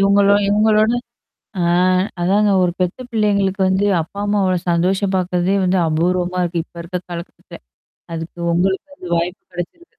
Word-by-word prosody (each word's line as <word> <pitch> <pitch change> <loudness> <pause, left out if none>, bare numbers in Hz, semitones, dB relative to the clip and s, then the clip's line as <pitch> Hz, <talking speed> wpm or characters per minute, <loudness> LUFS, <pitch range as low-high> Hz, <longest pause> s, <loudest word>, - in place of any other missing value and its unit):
இவுங்களோ 200 0 +4
இவுங்களோட 215 +2 +3 0.7
ஆ - - +1 0.6
அதாங்க 200 +3 +3
ஒரு 175 - +1
பெத்த 180 -1 -1
பிள்ளைங்களுக்கு 200 -3 +1
வந்து 190 +2 +1 0.2
அப்பா, 190 +5 -9
அம்மா 205 0 +1
அவ்ளோ 185 -1 +2
சந்தோஷம் 190 +3 +1
பார்க்கிறதே 180 +1 0
வந்து 185 +1 +2
அபூர்வமா 180 +3 0
இருக்கு. 170 -1 -2
இப்ப - - -46
இருக்க 180 +2 -4
காலகட்டத்துல. 170 0 -9 0.6
அதுக்கு 165 +1 -7 0.2
உங்களுக்கு 190 +11 -1
அந்த 180 - -10
வாய்ப்பு 175 +2 -2
கிடைச்சிருக்கு. 180 - -7
185 Hz, 145 wpm, -19 LUFS, 175-200 Hz, 0.7 s, இவுங்களோ